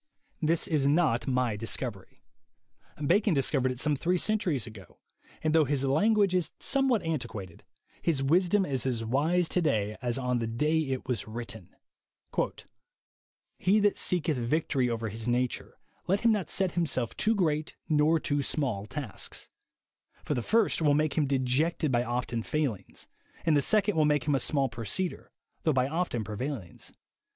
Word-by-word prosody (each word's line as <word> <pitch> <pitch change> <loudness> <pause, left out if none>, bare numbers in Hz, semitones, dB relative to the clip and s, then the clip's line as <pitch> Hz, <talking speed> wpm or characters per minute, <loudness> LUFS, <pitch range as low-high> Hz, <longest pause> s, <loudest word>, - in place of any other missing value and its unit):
This 165 +1 +2
is 150 -7 +1
not 145 -5 +2
my 125 -4 +1
discovery. 115 -1 -4 0.8
Bacon 195 +3 +3
discovered 135 -1 +2
it 125 - -6
some 150 +2 +1
three 175 +6 0
centuries 180 - 0
ago, 110 -5 -13 0.5
and 155 -1 +1
though 160 -1 +5
his 140 -1 0
language 200 +7 +3
is 180 -3 +1
somewhat 270 -5 +2
antiquated, 115 - -4 0.4
his 150 -5 0
wisdom 180 +7 +3
is 135 -7 -2
as 115 -3 -1
wise 160 +9 +1
to 180 - +1
day 105 -9 0
as 120 -1 -2
on 125 -2 0
the 115 - -2
day 150 +8 +1
it 135 -4 -3
was 125 -5 -2
written: 110 -4 -7 1.8
"He 195 +4 +3
that 205 -1 +3
seeketh 165 -5 0
victory 130 +1 0
over 115 -1 -2
his 110 +3 -5
nature, 125 +1 -1 0.3
let 195 +3 +1
him 235 - +4
not 205 -7 -1
set 190 -2 +1
himself 145 -9 -1
too 220 +1 +1
great 155 -5 0
nor 155 +1 +3
too 145 -1 0
small 125 -8 -2
tasks; 135 -7 -5 0.8
for - - 0
the 125 - -1
first 220 - +2
will 145 -2 +4
make 155 0 +1
him 150 -3 +2
dejected 140 +4 +1
by 120 -1 +2
often 120 -1 -2
failings, 135 -5 -3 0.4
and 160 -3 +4
the 145 - +4
second 210 +4 +2
will 155 -1 +3
make 150 0 +2
him 145 - +1
a 135 - +2
small 140 -2 +2
proceeder, 115 - -3 0.3
though 155 - +2
by 130 -1 +2
often 155 -7 -1
pre 105 0 -6
vailings. 125 - -5
145 Hz, 165 wpm, -29 LUFS, 120-165 Hz, 1.8 s, though